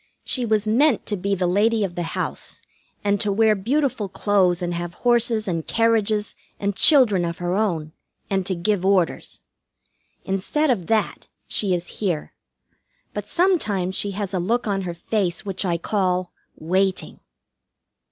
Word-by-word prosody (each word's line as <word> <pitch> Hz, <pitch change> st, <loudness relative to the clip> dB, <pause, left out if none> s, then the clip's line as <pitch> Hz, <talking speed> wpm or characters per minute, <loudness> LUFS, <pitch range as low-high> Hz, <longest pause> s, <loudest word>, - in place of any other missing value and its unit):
She 250 Hz, -3 st, +1 dB
was 215 Hz, -1 st, +1 dB
meant 250 Hz, +5 st, +3 dB
to 210 Hz, -, -2 dB
be 200 Hz, +1 st, -1 dB
the 180 Hz, -1 st, -1 dB
Lady 210 Hz, +5 st, +2 dB
of 190 Hz, -3 st, -3 dB
the 175 Hz, -, -4 dB, 0.2 s
House, -, -, -4 dB, 0.4 s
and 205 Hz, -1 st, +1 dB
to 205 Hz, -, +1 dB
wear 220 Hz, +2 st, +4 dB
beautiful 230 Hz, 0 st, -1 dB
clothes, 190 Hz, -2 st, +2 dB
and 175 Hz, 0 st, -2 dB
have 175 Hz, 0 st, -5 dB
horses 235 Hz, -3 st, +3 dB
and 165 Hz, -3 st, -2 dB
carriages 220 Hz, -2 st, +1 dB, 0.3 s
and 200 Hz, -1 st, -1 dB
children 245 Hz, -, +5 dB
of 170 Hz, 0 st, -3 dB
her 175 Hz, 0 st, -2 dB
own, 175 Hz, -7 st, -1 dB, 0.4 s
and 195 Hz, -1 st, 0 dB
to 185 Hz, -, 0 dB
give 185 Hz, +2 st, 0 dB
orders. 190 Hz, -3 st, 0 dB, 0.8 s
Instead 255 Hz, +10 st, 0 dB
of 190 Hz, -9 st, -2 dB
that, 220 Hz, -1 st, -1 dB, 0.2 s
she 195 Hz, -4 st, +2 dB
is 175 Hz, 0 st, -4 dB
here; 175 Hz, -7 st, -2 dB, 0.8 s
but -, -, -5 dB
sometimes 215 Hz, -, +1 dB
she 205 Hz, -, 0 dB
has 200 Hz, -2 st, -3 dB
a 185 Hz, -, 0 dB
look 230 Hz, +7 st, 0 dB
on 200 Hz, -2 st, -1 dB
her 175 Hz, -2 st, -5 dB
face 185 Hz, 0 st, -2 dB
which 195 Hz, -1 st, -2 dB
I 170 Hz, -2 st, 0 dB
call 185 Hz, -1 st, -1 dB, 0.2 s
"Waiting." 185 Hz, +3 st, -1 dB
200 Hz, 160 wpm, -22 LUFS, 180-220 Hz, 0.8 s, children